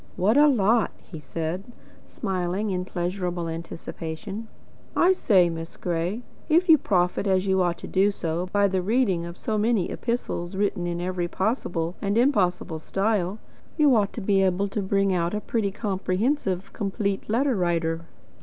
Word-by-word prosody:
"What 195 +5 +2
a 295 +1 +7
lot!" 230 -4 +3
he 165 - -9
said, 165 +4 -4 0.4
smiling 190 0 -2
in 180 -1 -2
pleasurable 175 -1 -2
anticipation. 165 +5 -6 0.5
"I 365 +2 +5
say, 190 - +4
Miss 165 0 -6
Gray, 175 +7 -2 0.3
if 340 +4 +4
you 320 -3 +7
profit 180 -4 +1
as 190 0 +2
you 190 -1 +2
ought 175 -1 +1
to - - -8
do 195 +2 +3 0.4
by 200 0 +3
the 190 -1 0
reading 195 -5 +1
of 170 - -9
so 215 -1 -1
many 215 -4 +1
epistles 205 -6 -3
written 195 -3 0
in 170 0 -2
every 180 0 -2
possible 175 -5 -1
and 200 +1 0
impossible 185 - +1
style, 195 +2 0 0.4
you 295 -5 +5
ought 205 -2 +2
to 230 - -5
be 195 0 +2
able 190 +1 +2
to 210 - -2
bring 195 0 +1
out 175 +2 0
a - - 0
pretty 210 -1 -1
comprehensive 195 +1 -1
'Complete 200 -1 -2
Letter 255 +4 +2
writer.' 165 -3 0
195 Hz, 160 wpm, -25 LUFS, 175-215 Hz, 0.5 s, a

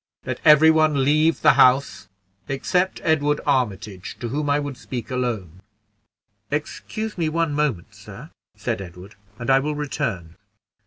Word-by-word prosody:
Let - - -4
every 155 +1 +7
one 155 -3 +2
leave 155 +4 +2
the 150 - +7
house 130 +2 +3 0.4
except 180 +7 -1
Edward 150 -2 +1
Armitage, 105 -8 -2
to 120 - -4
whom 145 +3 -2
I 145 +1 +2
would 145 -2 -5
speak 125 -1 -7
alone." 110 -9 -3 0.9
"Excuse 210 +8 -4
me 160 -2 +1
one 165 -1 -1
moment, 145 - -2
sir," - - -12 0.3
said 100 - -3
Edward, 90 +2 -11 0.2
"and 120 +3 -1
I 135 - +5
will 150 +2 -2
return." 135 - -4
145 Hz, 145 wpm, -22 LUFS, 120-150 Hz, 0.9 s, every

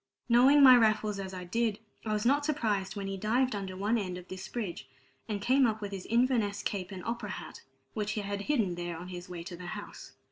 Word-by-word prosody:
Knowing 260 +4 +6
my 255 -2 +10
Raffles 215 -3 +2
as 190 -1 -5
I 185 -1 -6
did, 220 +3 0 0.3
I 215 - 0
was 210 +1 -1
not 285 +4 +3
surprised 215 -10 -1
when 200 -1 -4
he 195 0 -3
dived 240 +6 +1
under 190 -2 -5
one 210 +4 +1
end 185 -3 -4
of 180 0 -11
this 185 0 -6
bridge, 180 - -5 0.4
and 210 -1 -1
came 255 +5 +4
up 220 -1 -1
with 205 -1 -5
his 195 -2 -6
Inverness 230 -4 +1
cape 190 -2 -3
and 185 -2 -7
opera 230 -2 -3
hat, - - -7 0.3
which 210 0 -2
he 215 - -2
had 200 0 -3
hidden 215 -6 +1
there 175 -1 -4
on 175 +2 -8
his 180 -1 -8
way 175 -2 -6
to 175 0 -7
the 175 +1 -9
house. 205 - -10
205 Hz, 235 wpm, -30 LUFS, 185-235 Hz, 0.4 s, my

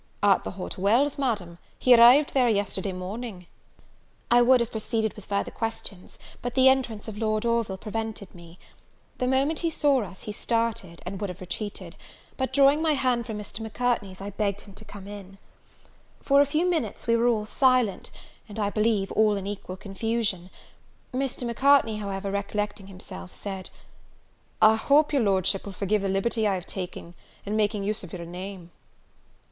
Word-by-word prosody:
"At 200 -2 +4
the - - -4
Hot 185 +1 -6
Wells, 245 +10 +2
Madam; 200 -10 -2 0.2
he 255 - +5
arrived 245 +5 +7
there 255 -3 +4
yesterday 200 -2 -1
morning." 185 +1 -6 0.9
I 240 0 +7
would 250 +1 +6
have 235 -1 -1
proceeded 220 0 -1
with 210 - -12
further 200 0 -1
questions, 225 -4 -6 0.2
but 245 - -4
the 265 0 +7
entrance 245 -6 0
of 210 -1 -6
Lord 215 0 0
Orville 230 -4 0
prevented 220 -1 -5
me. 170 0 -14 0.6
The 250 - 0
moment 270 +5 +1
he 335 - 0
saw 285 -4 +2
us, 190 -3 -8
he 210 - -5
started, 225 -6 -2
and 190 +2 -6
would 205 - -2
have 180 - -8
retreated; 195 +3 -6 0.4
but, 260 -1 -2
drawing 280 +2 +5
my 320 -1 +3
hand 250 -4 0
from 220 -2 -4
Mr. 210 0 -7
Macartney's, 220 -4 -2
I 200 +1 -5
begged 200 0 -1
him 200 - -12
to 215 - -9
come 205 -2 -10
in. 195 -1 -10 0.9
For 280 0 +5
a 285 - +3
few 310 +5 +1
moments 320 - -1
we 230 - +3
were 230 +1 +3
all 220 -3 +1
silent, 250 -2 +2 0.4
and, 205 - -8
I 205 -2 0
believe, 210 -2 +1
all 215 -1 +3
in 195 -1 -4
equal 195 -2 -6
confusion. 200 -2 -2 0.6
Mr. 260 -1 -2
Macartney, 235 -2 +3
however, 200 -1 -4
recollecting 200 0 -3
himself 180 - -10
said 190 -2 -6 0.9
"I 220 +1 +7
hope 295 +6 +3
your 280 - +3
Lordship 195 -2 +2
will 200 - -7
forgive 205 +2 0
the 195 - -1
liberty 215 +3 +1
I 195 - +1
have 180 - -5
taken 180 -2 -6 0.3
in 205 +1 -2
making 210 -1 +1
use 210 +1 -1
of 175 - -9
your 170 -2 -6
name." 180 0 -8
215 Hz, 175 wpm, -26 LUFS, 195-240 Hz, 0.9 s, arrived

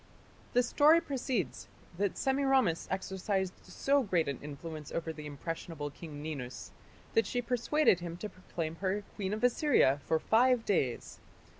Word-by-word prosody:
The 245 - +4
story 295 +6 +5
proceeds 265 - -2 0.3
that 200 -2 0
Semiramis 265 -9 +2
exercised 190 0 -1
so 275 +9 +1
great 180 - +1
an 140 -3 -3
influence 150 +1 -7
over 165 -1 -3
the 150 -1 -8
impressionable 150 0 -5
King 145 -1 -9
Ninus, 130 -6 -6 0.4
that 225 -2 +3
she 245 - -1
persuaded 245 - +2
him 170 -1 -6
to 210 - -4
proclaim 170 -4 -5
her 195 +2 -1
Queen 195 -2 -3
of 215 +2 -3
Assyria 245 - +4
for 160 - +2
five 240 +6 +3
days. 135 - -1
190 Hz, 145 wpm, -32 LUFS, 160-245 Hz, 0.4 s, story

